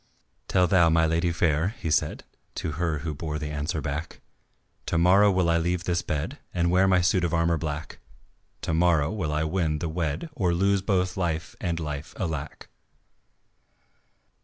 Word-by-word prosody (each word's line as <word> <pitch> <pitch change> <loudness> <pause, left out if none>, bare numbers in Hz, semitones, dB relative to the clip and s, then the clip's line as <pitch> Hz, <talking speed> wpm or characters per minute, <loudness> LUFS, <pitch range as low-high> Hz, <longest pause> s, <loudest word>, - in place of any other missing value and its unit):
"Tell 90 - +3
thou 85 -1 +4
my 80 0 +4
lady 85 +2 +1
fair," 85 +4 +1
he 80 - -3
said, 75 - 0 0.3
To 80 - -3
her 80 +1 -1
who 80 - -2
bore 75 +1 -4
the 75 0 -4
answer 75 +1 -2
back, 75 +4 -5 0.7
"To 85 - 0
morrow 95 +5 +5
will 95 -2 +2
I 85 0 +3
leave 85 +1 -1
this 85 -1 0
bed 75 -3 -3 0.2
And 85 -1 +2
wear 95 +2 +4
my 90 -1 +4
suit 90 +1 +2
of 85 -1 0
armour 85 -1 +2
black; 75 0 -5 0.6
To 80 - -1
morrow 80 -3 +3
will 90 -8 -2
I 75 +1 0
win 80 -1 0
and 80 0 -3
wed 85 - -2
Or 90 - 0
lose 100 +2 +2
both 95 -2 0
love 85 -2 -2
and 85 -2 -1
life, 75 -1 -5
alack." 80 -5 -4
85 Hz, 175 wpm, -26 LUFS, 80-90 Hz, 0.7 s, morrow